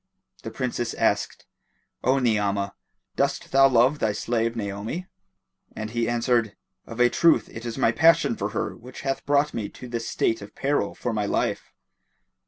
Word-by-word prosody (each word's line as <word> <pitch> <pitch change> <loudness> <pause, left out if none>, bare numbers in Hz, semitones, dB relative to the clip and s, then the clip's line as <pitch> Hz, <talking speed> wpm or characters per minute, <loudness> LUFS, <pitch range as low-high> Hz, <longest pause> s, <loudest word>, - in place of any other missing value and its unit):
The - - -6
Princess 120 -2 -3
asked, - - 0 0.6
"O 130 +2 +3
Ni'amah, 105 -5 0 0.4
dost - - -1
thou 135 0 +7
love 130 +4 +3
thy 110 -1 +1
slave 115 +1 -1
Naomi?"; 105 - -4 0.7
and 110 0 -5
he 120 0 0
answered, 120 -2 +1 0.3
"Of 115 - -8
a 120 - +6
truth 165 +6 +3
it 115 +1 -7
is 115 - -5
my 115 - +3
passion 160 -3 +4
for 100 0 -3
her 110 - -3
which 125 +2 -11
hath 135 0 -2
brought 145 +1 +2
me 110 -3 -3
to 125 - -11
this 115 -1 -4
state 115 - 0
of 100 +1 -11
peril 140 +2 0
for 120 - -3
my 105 -2 -1
life." - - -1
115 Hz, 170 wpm, -25 LUFS, 110-130 Hz, 0.7 s, thou